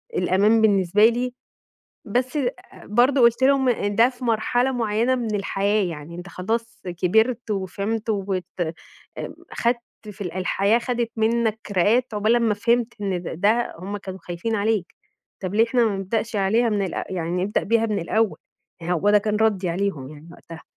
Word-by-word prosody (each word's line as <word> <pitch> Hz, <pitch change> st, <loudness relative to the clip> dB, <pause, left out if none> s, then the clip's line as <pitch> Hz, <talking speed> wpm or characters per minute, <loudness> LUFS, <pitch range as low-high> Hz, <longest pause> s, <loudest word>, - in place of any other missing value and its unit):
الأمان 210 Hz, -, +3 dB
بالنسبة 200 Hz, 0 st, +4 dB
لي، 245 Hz, +2 st, +1 dB, 0.7 s
بس 250 Hz, +6 st, -1 dB, 0.5 s
برضه 250 Hz, +6 st, +3 dB
قلت 235 Hz, +2 st, +4 dB
لهم 265 Hz, -1 st, +4 dB
إن 205 Hz, -4 st, 0 dB
ده 235 Hz, +2 st, +6 dB
في 250 Hz, -1 st, -9 dB
مرحلة 245 Hz, +3 st, +1 dB
معيّنة 230 Hz, +1 st, +1 dB
من 235 Hz, -4 st, -2 dB
الحياة 200 Hz, +1 st, 0 dB
يعني، 165 Hz, -2 st, -6 dB
أنت 175 Hz, +2 st, -8 dB
خلاص 225 Hz, +5 st, -4 dB
كبرت 220 Hz, +7 st, +1 dB
وفهمت 205 Hz, +3 st, -2 dB
وت 195 Hz, -3 st, -2 dB, 1.1 s
خدت 235 Hz, +1 st, +1 dB, 0.3 s
في 205 Hz, -, -15 dB
ال 180 Hz, -4 st, -4 dB
الحياة 195 Hz, +4 st, +1 dB
خدت 240 Hz, -1 st, -2 dB
منك 225 Hz, 0 st, +1 dB, 0.2 s
راقات 225 Hz, +6 st, +2 dB
عقبال 215 Hz, +3 st, +2 dB
امّا 230 Hz, -3 st, +2 dB
فهمت 235 Hz, +2 st, +1 dB
إن 190 Hz, -3 st, -2 dB
د -, -, -5 dB
ده 225 Hz, +4 st, +2 dB
هم 195 Hz, +4 st, -5 dB
كانوا 190 Hz, -1 st, -8 dB
خايفين 175 Hz, +6 st, -3 dB
عليك، 205 Hz, -3 st, -1 dB, 0.5 s
طب 185 Hz, 0 st, -4 dB
ليه 220 Hz, +2 st, +5 dB
إحنا 235 Hz, +1 st, +2 dB
ما 210 Hz, -3 st, 0 dB
نبدأش 215 Hz, +3 st, -2 dB
عليها 220 Hz, +5 st, +2 dB
من 205 Hz, -2 st, 0 dB
الأ -, -, -4 dB
يعني 180 Hz, 0 st, -2 dB
نبدأ 205 Hz, -, 0 dB
بيها 225 Hz, +1 st, +2 dB
من 210 Hz, -2 st, -1 dB
الأول، 215 Hz, +5 st, 0 dB, 0.4 s
هو 175 Hz, +3 st, +1 dB
ده 210 Hz, -, +6 dB
كان 210 Hz, 0 st, -1 dB
ردي 205 Hz, -4 st, +1 dB
عليهم 170 Hz, -7 st, -2 dB
يعني 150 Hz, +2 st, -13 dB
وقتها. 165 Hz, -1 st, -12 dB
210 Hz, 165 wpm, -23 LUFS, 190-235 Hz, 1.1 s, ده